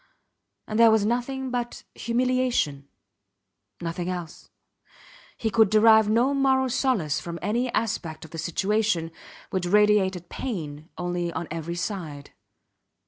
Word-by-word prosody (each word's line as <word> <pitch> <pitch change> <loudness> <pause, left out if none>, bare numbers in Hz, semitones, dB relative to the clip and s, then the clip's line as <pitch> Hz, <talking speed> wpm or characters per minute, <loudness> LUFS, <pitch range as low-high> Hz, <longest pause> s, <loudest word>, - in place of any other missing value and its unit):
And 215 +1 -2
there 230 -1 +8
was 220 -2 +3
nothing 250 +3 -2
but 240 -1 -3
humiliation. 245 - 0 0.9
Nothing 170 +1 -3
else. 175 -3 -6 0.9
He 220 - -1
could 220 -1 +5
derive 220 0 +6
no 240 +6 +3
moral 265 -2 +2
solace 220 - +1
from 170 -1 -6
any 235 +5 0
aspect 195 -8 -2
of 160 - -15
the 165 - -6
situation, 190 -1 0 0.4
which 185 -2 -1
radiated 195 -3 +3
pain 160 - -5
only 175 -1 -2
on 160 0 -4
every 165 +1 -4
side. 170 -6 -5
210 Hz, 125 wpm, -25 LUFS, 170-235 Hz, 0.9 s, there